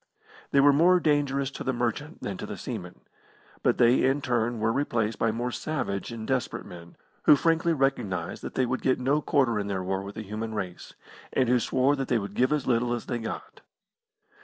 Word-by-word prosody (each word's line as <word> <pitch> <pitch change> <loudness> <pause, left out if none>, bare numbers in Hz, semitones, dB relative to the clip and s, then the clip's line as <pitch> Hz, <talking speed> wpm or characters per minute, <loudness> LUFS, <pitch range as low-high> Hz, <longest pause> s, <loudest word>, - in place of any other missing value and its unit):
They 140 - +3
were 145 +1 +6
more 175 +5 +5
dangerous 140 -3 +1
to - - -6
the 130 - 0
merchant 125 +7 -3
than 100 - -3
to - - -6
the - - -6
seaman. - - -7 0.6
But - - +2
they 120 +2 +4
in 135 +2 +3
turn 120 -2 0
were 110 +1 +1
replaced 115 -6 -1
by 115 - +2
more 120 +2 -2
savage 120 -9 -3
and 115 -2 -6
desperate 130 -3 -1
men, 85 -1 -11 0.3
who - - +8
frankly 165 +3 +2
recognised 125 - -1
that - - -7
they 130 - +2
would 130 +1 -2
get 130 - +2
no 140 +4 +1
quarter 130 -8 +2
in 100 - -3
their 95 -2 -2
war 95 +1 -1
with 100 +1 -8
the 110 - -5
human 110 +2 -5
race, 95 -4 -6 0.4
and 130 - +2
who 125 +1 +4
swore 130 +4 +2
that 135 -1 -2
they 125 - +2
would 100 -2 -4
give 130 +5 +2
as 150 -3 0
little 120 0 +1
as 120 - -6
they 120 - -3
got. 115 - -7
125 Hz, 210 wpm, -27 LUFS, 110-140 Hz, 0.6 s, who